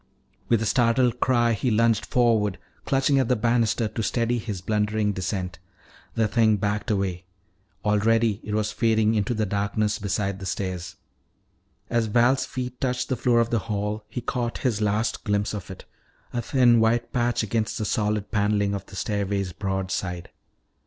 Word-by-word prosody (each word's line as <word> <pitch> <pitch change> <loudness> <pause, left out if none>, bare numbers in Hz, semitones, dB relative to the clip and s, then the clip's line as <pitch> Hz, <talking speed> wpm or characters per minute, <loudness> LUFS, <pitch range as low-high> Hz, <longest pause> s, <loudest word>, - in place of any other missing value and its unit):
With 115 -2 +3
a - - -1
startled 120 +1 +2
cry 120 -2 +3
he 120 +4 0
lunged 115 -1 +2
forward, 110 -5 +2 0.3
clutching 135 +1 +2
at 130 - +1
the 125 - +3
banister 115 -1 +1
to 115 - -4
steady 120 +2 0
his 105 -4 -5
blundering 105 +1 0
descent. 90 -2 -3 0.6
The 110 -1 +2
thing 110 -1 +3
backed 105 +1 -2
away; 95 -3 -1 0.6
already 110 0 +2
it 105 - -3
was 110 0 0
fading 110 -1 +2
into 110 +3 0
the 110 0 0
darkness 100 +2 -1
beside 100 -1 -2
the 95 - -6
stairs. 90 -3 -4 0.9
As 115 -2 0
Val's 120 +4 +3
feet 125 -1 -5
touched 125 -1 -1
the 130 - +1
floor 120 -1 +2
of 115 - -1
the 115 - +2
hall 105 +1 -2
he 125 - -4
caught 120 0 -2
his 110 -4 +1
last 105 +2 0
glimpse 105 0 0
of 100 -4 -6
it, 95 - -9 0.5
a 120 - -1
thin 120 -1 +4
white 115 +1 +1
patch 120 -2 +1
against 110 +1 -1
the 110 - -2
solid 105 -1 -1
paneling 105 -1 +1
of 100 -1 -5
the 95 - -12
stairway's 100 -2 -2
broad 95 -1 -3
side. 90 -2 -4
110 Hz, 170 wpm, -25 LUFS, 100-120 Hz, 0.9 s, thin